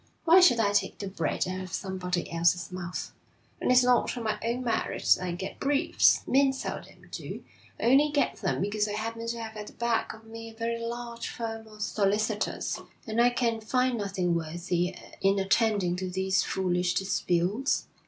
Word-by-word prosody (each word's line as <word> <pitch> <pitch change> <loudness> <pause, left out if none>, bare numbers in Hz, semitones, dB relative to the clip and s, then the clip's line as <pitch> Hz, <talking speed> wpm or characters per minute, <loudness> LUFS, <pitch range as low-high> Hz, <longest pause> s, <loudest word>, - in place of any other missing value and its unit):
Why 340 +3 +8
should 255 -11 +6
I 205 -2 +3
take 205 - +1
the 200 - -5
bread 175 -3 -1
out 185 0 -3
of 185 -1 -8
somebody 180 -2 -3
else's 170 +2 +2
mouth? 180 -1 -5 0.5
And - - +2
it's 250 0 +6
not 250 0 +2
on 235 - -4
my 215 -1 -1
own 235 +2 -1
merit 235 -2 -2
that - - -7
I 180 - -2
get 190 +2 -6
briefs 280 0 +3
men 270 0 +4
seldom 265 - -7
do - - -6 0.4
I - - -5
only 275 +5 +5
get 290 -1 +1
them 190 -3 -1
because 210 +2 0
I 205 - -3
happen 230 +2 -4
to 235 0 -2
have 220 -1 -6
at 210 -1 -7
the - - -11
back 235 -1 0
of 220 0 -17
me 225 0 -9
a 225 - -14
very 230 +1 -2
large 235 0 -5
firm 225 -1 -5
of 215 -1 -7
solicitors. 210 +1 0 0.3
And 225 0 +1
I 240 - +6
can 235 -2 0
find 250 +2 +1
nothing 190 -4 -1
worthy 170 +2 -1 0.3
in 195 +1 +3
attending 195 -2 +2
to 185 0 -3
these 190 +1 +1
foolish 180 -1 0
disputes. 195 +5 0
215 Hz, 190 wpm, -28 LUFS, 185-235 Hz, 0.5 s, Why